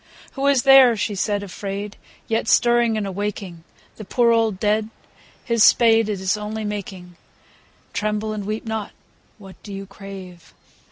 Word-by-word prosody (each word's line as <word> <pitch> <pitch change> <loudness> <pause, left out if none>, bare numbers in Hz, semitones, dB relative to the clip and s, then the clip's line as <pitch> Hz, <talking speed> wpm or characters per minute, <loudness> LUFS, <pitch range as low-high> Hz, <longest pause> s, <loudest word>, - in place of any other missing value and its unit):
II. - - -23
Who 275 0 -1
is 275 -3 +3
there, 270 -4 +7
she 210 - -2
said 205 +1 -1
afraid, 200 +1 -6 0.3
yet 225 0 -1
Stirring 235 -2 +3
and 210 - -2
awaking 195 -3 -5 0.3
The 215 - -8
poor 235 +3 +2
old 225 -4 +1
dead? 215 +1 0 0.6
His 230 -3 +2
spade, 225 -2 +5
it 205 -3 -2
Is 190 +2 0
only 210 +1 -5
making, 190 -4 -7 0.4
— - - -33
(Tremble 215 +1 -2
and 210 -1 -5
weep 215 +2 -4
not 220 -2 -4
I - - -25 0.5
What 195 -3 -14
do 205 - -11
you 195 0 -6
crave 195 -3 -12
210 Hz, 170 wpm, -21 LUFS, 195-225 Hz, 0.6 s, there